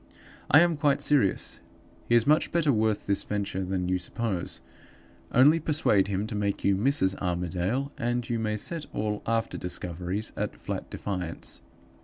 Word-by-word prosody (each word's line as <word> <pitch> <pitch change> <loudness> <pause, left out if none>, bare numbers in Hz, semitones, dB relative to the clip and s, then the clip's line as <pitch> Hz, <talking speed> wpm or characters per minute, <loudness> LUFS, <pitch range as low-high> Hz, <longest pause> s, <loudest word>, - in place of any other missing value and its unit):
"I 145 - +8
am 170 -2 +2
quite 145 -2 +2
serious. 135 -10 +1 0.5
He 120 - +5
is 120 -1 +4
much 155 +3 +3
better 160 -5 +2
worth 110 -1 +1
the 100 - +2
venture 100 -1 -2
than 90 -1 -2
you 90 0 +1
suppose. 95 0 -3 0.7
Only 145 +6 +6
persuade 145 -11 +2
him 100 +1 -1
to 110 - -6
make 100 -1 -1
you 100 - +3
Mrs. 100 -3 +2
Armadale, 90 - -1
and 120 0 -1
you 115 -1 -1
may 110 -1 -1
set 165 +8 -4
all 105 0 -2
after 115 0 -1
discoveries 90 +3 -3
at - - -3
flat - - -5
defiance. 90 -5 -3
105 Hz, 160 wpm, -27 LUFS, 95-130 Hz, 0.7 s, I